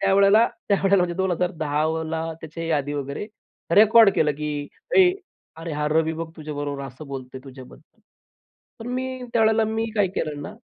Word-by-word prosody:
त्यावेळेला, 200 +3 +5 0.2
त्यावेळेला 200 0 +3
म्हणजे 175 -1 -2
2010ला 160 -3 -1 0.2
त्याची 160 +1 -9
ही 165 0 -3
आदी 145 -1 -1
वगैरे 140 +6 -4 0.5
रेकॉर्ड 220 +1 +7
केलं, 150 -1 +2
की 145 0 -4 0.3
"ए 370 -2 +7 0.5
अरे 165 0 -6
हा 150 0 -1
रवी 160 +1 +1
बघ 165 0 -5
तुझ्याबरोबर 145 -3 -5
असं 135 +3 -10
बोलतोय 130 -1 -7
तुझ्याबद्दल." 135 - -14 0.8
पण 225 - -9
मी 255 0 -4
त्यावेळेला 220 -1 +3
मी 220 +1 -2
काय 205 -2 +3
केलं 150 -2 -2
ना - - -8
160 Hz, 150 wpm, -23 LUFS, 145-200 Hz, 0.8 s, रेकॉर्ड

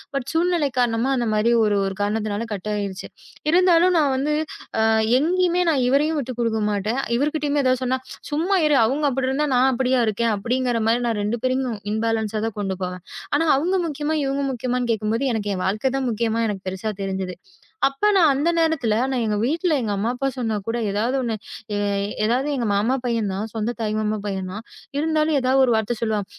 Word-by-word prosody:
But 275 -2 -2
சூழ்நிலை 335 -3 +2
காரணமா, 240 +1 +1
அந்த 240 -1 0
மாதிரி 215 +2 +2
ஒரு 210 -1 +2
ஒரு 195 0 -3
காரணத்துனால 210 +1 -1
கட் 205 +1 -5
ஆயிருச்சு. 200 -2 -4 0.4
இருந்தாலும், 360 0 +5
நான் 295 -4 +3
வந்து 285 +3 0 0.5
அ - - +3 0.4
எங்கயுமே 355 +3 +2
நான் 280 -4 +1
இவரையும் 300 +5 +2
விட்டுக் 255 -3 -5
குடுக்க 225 -1 0
மாட்டேன். 210 +5 -1 0.2
இவர்கிட்டயும் 295 +1 0
எதாவது 255 0 +2
சொன்னா, 255 +1 +1 0.3
"சும்மா 335 +7 +1
இரு. 300 - +3
அவங்க 275 +7 -1
அப்டிருந்தா 265 +3 0
நான் 255 +2 +4
அப்டியா 255 +1 +1
இருக்கேன்." 225 +2 +1
அப்டிங்கிற 245 +3 0
மாதிரி 240 +2 +2
நான் 225 -3 -1
2 220 +3 -1
பேரையும் 255 -3 0 0.2
இம்பாலண்ஸ் 220 -1 -1
ஆ - - -3
தான் 225 - -7
கொண்டு 195 -2 -2
போவேன். 180 -1 -5 0.3
ஆனா, 290 +3 +3
அவங்க 345 +7 0
முக்கியமா, 300 +1 -2
இவங்க 275 +1 -1
முக்கியமான்னு 250 0 -2
கேக்கும்போது, 215 0 -2 0.2
எனக்கு 210 -2 -2
என் 185 - -4
வாழ்க்கை 215 +7 0
தான் 265 -1 -1
முக்கியமா 230 0 -1
எனக்குப் 195 -3 -5
பெருசா 190 +4 -4
தெரிஞ்சுது. 190 -1 -3 0.5
அப்போ 275 +9 0
நான் 340 -5 +6
அந்த 290 +5 +1
நேரத்துல, 320 -10 +1
நான் 255 -3 0
எங்க 210 -1 0
வீட்டுல 325 +5 +1
எங்க 220 -3 -2
அம்மா 205 +4 -1
அப்பா 270 +2 -2
சொன்னாக்கூட 225 -2 -2
ஏதாவது 225 +6 0
ஒண்ணு, 235 -3 -1 0.9
ஏதாவது 250 +5 +1
எங்க 245 -3 -1
மாமா 215 +6 +2
பையன் 230 -4 0
தான், 200 +3 -3
சொந்த 225 +1 -1
தாய் 215 -1 -1
மாமா 215 0 -1
பையன் 190 -2 -3
தான். 215 +4 -7 0.3
இருந்தாலும், 310 0 +1
ஏதாவது 260 +1 +2
ஒரு 245 - +1
வார்த்தை 220 +2 0
சொல்லுவான். 215 -3 0
240 Hz, 185 wpm, -22 LUFS, 215-280 Hz, 0.9 s, நான்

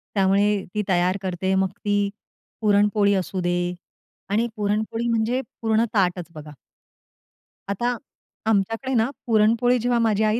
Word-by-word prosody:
त्यामुळे 200 +1 +3
ती 210 - 0
तयार 180 +1 +2
करते, 190 0 -1
मग 190 0 +2
ती 205 -1 0 0.5
पुरणपोळी 205 -1 +3
असू 185 +2 -5
दे 175 0 0 0.6
आणि 220 +4 +1
पुरणपोळी 215 +3 -1
म्हणजे 230 +2 +1 0.2
पूर्ण 225 0 +2
ताटच 180 -3 +1
बघा. 150 -1 -9 1.2
आता 240 +5 0 0.5
आमच्याकडे 225 +5 0
ना, 230 +1 +2 0.2
पुरणपोळी 230 +3 +3
जेव्हा 240 0 +1
माझी 220 -2 +2
आई 215 +2 +2
210 Hz, 125 wpm, -23 LUFS, 190-225 Hz, 1.2 s, त्यामुळे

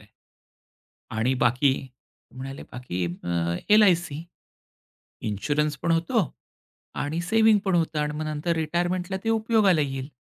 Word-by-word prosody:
आहे - - -20 1.1
आणि 125 +4 +2
बाकी?" 130 +3 +3 0.6
म्हणाले 135 +1 -7
बाकी 95 -8 -3
अ, 85 -1 -2
"एल-आय-सी, 175 -7 +4 1.1
इन्शुरन्स 150 +9 0
पण 170 - +2
होतो 170 +6 +2 0.8
आणि 160 +4 -2
सेव्हिंग 220 -1 +5
पण 190 - +2
होतं 160 -2 0
आणि 150 0 -1
मग 155 - -3
नंतर 165 +3 -1
रिटायरमेंटला 175 +4 -1
ते 225 - +1
उपयोगाला 215 -7 +3
येईल." 135 0 -3
155 Hz, 125 wpm, -25 LUFS, 135-180 Hz, 1.1 s, सेव्हिंग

